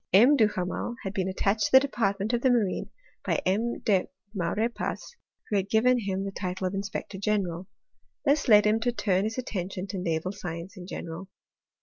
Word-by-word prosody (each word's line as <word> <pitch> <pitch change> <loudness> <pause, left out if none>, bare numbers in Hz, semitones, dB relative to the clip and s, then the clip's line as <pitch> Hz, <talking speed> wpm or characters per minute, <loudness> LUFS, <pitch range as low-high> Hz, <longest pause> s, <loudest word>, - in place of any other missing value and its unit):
M. 240 +10 +7
Duhamel 210 -1 0
had 195 - -4
been 190 -2 -1
attached 195 +2 +1
to - - -10
the 265 - +11
department 220 -6 -1
of 240 - +1
the 260 - +4
marine 225 -6 +1 0.3
by - - 0
M. 220 +6 +1
de 195 -4 +2 0.3
Maurepas, 215 - -2 0.4
who 205 - +3
had 195 0 -1
given 245 +3 +4
him 195 -3 -2
the 195 - -3
title 185 -1 -4
of 185 - -1
inspector 195 0 -4
general. 190 -4 -1 0.6
This 285 +1 +2
led 210 -3 +7
him 215 +1 +3
to 245 +2 +1
turn 195 -4 +1
his 220 +2 -3
attention 190 -6 -4
to 190 - -3
naval 170 0 -1
science 175 -2 -7
in 180 -1 -9
general. 175 +1 -7
200 Hz, 185 wpm, -27 LUFS, 185-225 Hz, 0.6 s, the